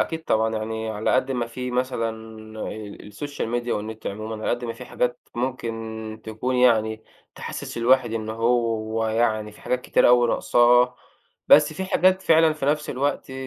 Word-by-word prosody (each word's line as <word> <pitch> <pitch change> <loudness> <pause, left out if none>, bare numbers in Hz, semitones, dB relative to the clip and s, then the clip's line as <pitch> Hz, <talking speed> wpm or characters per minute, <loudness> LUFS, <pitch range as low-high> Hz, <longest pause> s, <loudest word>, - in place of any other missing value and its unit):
أكيد 160 0 -2
طبعًا 110 0 +1
يعني 110 +1 -4
على 110 +3 0
قد 130 +1 +1
ما 120 -3 -1
في 125 +2 -5
مثلًا 125 -2 -1 0.5
آآ 105 -2 -6
الSocial 145 +5 -5 0.2
media 120 - -8
والنت 110 +1 -4
عمومًا 110 +2 -5
على - - -1
قد 120 0 -2
ما 115 - -3
في 125 - -10
حاجات 125 0 -2
ممكن 115 -3 -4
تكون 115 +4 -2
يعني 110 -3 +2 0.3
تِحسس - - -7
الواحد 120 -1 +3
إن 110 -1 -3
هو 115 -1 0
يعني 110 -2 0
في - - -17
حاجات 125 0 -1
كتيرة - - +3
أوي 120 -1 +5
ناقصاه. 125 +1 +4 0.5
بس 150 +1 +7
في 190 +5 -4
حاجات 185 0 +2
فعلًا 160 -1 +5
في 150 -3 -4
نفس 150 +1 0
الوقت 135 0 -2
120 Hz, 170 wpm, -24 LUFS, 110-130 Hz, 0.5 s, بس